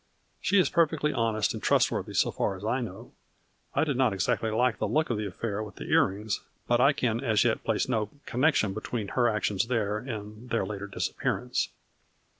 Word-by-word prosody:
She 205 - +2
is 185 - +5
perfectly 160 -3 +2
honest 115 -3 +1
and - - -6
trustworthy - - +1
so - - +3
far 95 - -1
as 95 +2 -8
I 125 +4 +1
know. 115 +1 -7 0.6
I - - +3
did 145 -5 0
not 130 -5 +3
exactly 95 +4 0
like 115 +2 +1
the 110 - 0
look 155 +6 +1
of 115 - 0
the 105 - -2
affair 105 +2 -3
with 105 -2 -7
the - - -7
earrings, 105 +2 +2 0.3
but 120 0 +3
I 140 - +6
can 115 -5 0
as 110 -5 +3
yet 120 -2 +1
place 110 -2 0
no 110 -5 0 0.2
connec 140 +6 +2
tion 100 -3 +1
between 110 0 -4
her 120 +2 +2
actions 105 -1 0
there 105 -4 0
and 110 -1 -7
their 115 - +1
later 100 -1 -5
disappearance." 95 - -1
110 Hz, 200 wpm, -28 LUFS, 105-125 Hz, 0.6 s, I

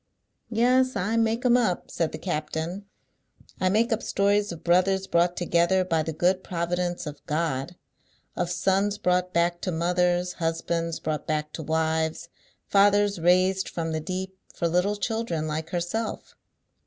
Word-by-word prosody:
"Yes; 255 +3 +3
I 200 +3 0
make 230 +2 +1
'em 245 -1 +5
up," 220 -8 0
said 165 -2 -1
the - - -5
captain. 165 +3 -3 0.7
"I 185 - +2
make 225 +5 +2
up 225 - -2
stories 205 0 +1
of 170 - -9
brothers 185 +2 +3
brought 175 0 +1
together 175 +2 +2
by 165 -3 +1
the 160 - -3
good 180 +4 +1
providence 175 0 -2
of 150 -1 -8
GOD, 155 0 -1 0.6
of 175 -1 -1
sons 195 +3 +1
brought 180 -2 +1
back 175 0 +1
to 185 - -2
mothers, 180 +1 +1
husbands 165 0 -2
brought 155 -1 -3
back 150 -1 -2
to - - -5
wives, 160 +1 -1 0.4
fathers 205 -1 +4
raised 185 +3 +3
from 165 -1 -3
the 160 - -1
deep, 190 +3 -4 0.2
for 170 - 0
little 180 +5 +1
children 210 -6 -2
like 155 +1 -3
herself." 180 +6 -3
180 Hz, 155 wpm, -26 LUFS, 165-200 Hz, 0.7 s, em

